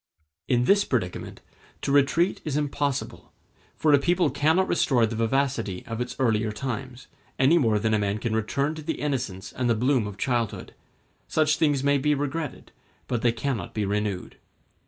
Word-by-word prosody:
In 120 -1 +2
this 200 +5 +4
predicament, 95 -9 -3 0.4
to - - -1
retreat 145 +6 +2
is 150 -2 -2
impossible; 145 -2 -2 0.4
for 155 -2 +3
a 145 - +6
people 175 0 +2
cannot 160 +8 +2
restore 120 -4 +3
the 115 +1 -4
vivacity 115 -4 -1
of 115 +1 -4
its 125 0 -4
earlier 110 -4 +1
times, 130 +2 -5 0.3
any 145 +6 +5
more 115 -7 +2
than 110 +1 0
a 110 - +3
man 100 0 0
can 110 0 -2
return 140 +7 0
to 160 - -8
the 160 +2 -3
innocence 120 -10 -3
and 125 -1 -1
the 115 - +3
bloom 125 -1 +1
of 100 -1 -8
childhood; 120 -1 -2 0.5
such 150 -1 +2
things 145 -4 +2
may 140 0 +3
be 150 +2 +2
regretted, 145 +1 -4 0.4
but 120 -3 -1
they 120 - +3
cannot 115 -4 -3
be 105 -2 0
renewed. 100 -2 -2
130 Hz, 175 wpm, -26 LUFS, 110-145 Hz, 0.5 s, a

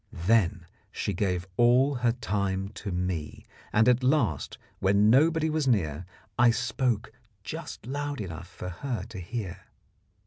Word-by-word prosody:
Then 95 -4 +3 0.3
she 100 - -2
gave 90 -1 -1
all 125 +4 +5
her 120 -2 +1
time 100 -4 -2
to 105 -1 -6
me, 90 -4 -3 0.3
and 110 +2 +4
at 125 0 +4
last, 125 - +1 0.2
when 100 +3 +4
nobody 160 +5 +4
was 155 -2 0
near, 90 - 0 0.3
I 120 0 +7
spoke 120 -1 0 0.3
just - - -7
loud 145 +2 -3
enough 85 -4 -6
for 90 0 -7
her 115 +4 -4
to 110 -5 -7
hear. 95 +1 -6
105 Hz, 140 wpm, -28 LUFS, 90-125 Hz, 0.3 s, I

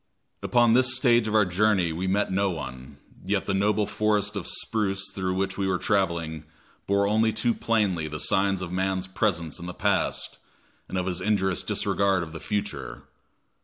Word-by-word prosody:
Upon 120 -2 +3
this 130 +1 +4
stage 120 -3 +3
of 110 - -1
our 105 -1 +5
journey 90 -2 +2
we 90 +4 -3
met 100 +2 +1
no 100 +1 +1
one, 70 -4 -7 0.3
yet 95 +1 -1
the 100 - -1
noble 105 +2 +2
forest 105 0 0
of 100 - -4
spruce 100 -3 -1
through 95 -1 -2
which 95 +1 -2
we 95 - 0
were 95 -1 +1
traveling 85 -6 -1 0.4
bore 100 0 +2
only 110 +2 +2
too 110 +2 0
plainly 100 -10 0
the 75 0 -5
signs 95 +1 +1
of 85 - -6
man's 95 0 -1
presence 95 -4 -1
in 85 - -7
the 90 - -6
past, - - -1 0.5
and 95 - -3
of 90 - -1
his 90 -1 -2
injurious 95 -3 +1
disregard 95 -2 +1
of 80 -1 -9
the 80 - -6
future. 105 +3 -4
95 Hz, 180 wpm, -26 LUFS, 90-105 Hz, 0.5 s, our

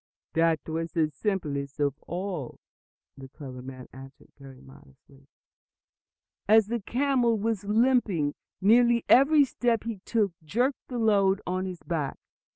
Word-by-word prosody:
"That 165 -1 +2
was 165 +1 -4
the 155 -2 +1
simplest 145 -6 -3
of 145 -2 +1
all," 175 -6 -5 0.6
the 135 -1 -11
clever 130 -2 -10
man 130 0 -10
answered 135 +1 -14
most 135 -2 -13
modestly. 135 - -19 1.2
"As 220 0 +6
the 235 0 -1
camel 245 0 +1
was 215 -1 -2
limping, 210 - +2 0.3
nearly 235 +3 +4
every 285 +3 +6
step 240 -3 -1
he 225 -3 -5
took 215 -5 0
jerked 245 - -1
the 250 - -5
load 200 -4 +3
on 185 +1 -2
his 180 -2 -8
back. 155 -6 -3
190 Hz, 135 wpm, -27 LUFS, 145-230 Hz, 1.2 s, As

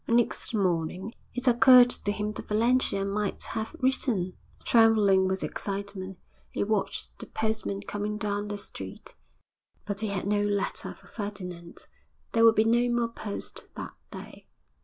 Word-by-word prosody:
Next 235 0 +1
morning 185 +2 -1 0.2
it 250 +1 -1
occurred 245 +1 +8
to 205 - -1
him 210 0 -2
that - - -8
Valentia 220 -2 +2
might 205 +1 -2
have 220 +7 -4
written. 240 -8 +1 0.3
Trembling 210 -5 +5
with 190 0 -1
excitement, 195 -2 -5 0.3
he - - -1
watched 210 -1 -2
the - - -8
postman 220 -2 -2
coming 210 +1 -3
down 205 -1 -2
the 205 0 -4
street 200 - -8 0.7
but 205 -1 -3
he 220 - -1
had 200 -2 -2
no 205 0 +2
letter 205 -1 -2
for - - -21
Ferdinand. 180 -5 -7 0.5
There 230 - +3
would 225 -1 +7
be 215 - +4
no 240 +2 +3
more 240 -1 +1
post 215 -3 -6
that - - -6 0.2
day. - - -10
210 Hz, 150 wpm, -28 LUFS, 200-225 Hz, 0.7 s, occurred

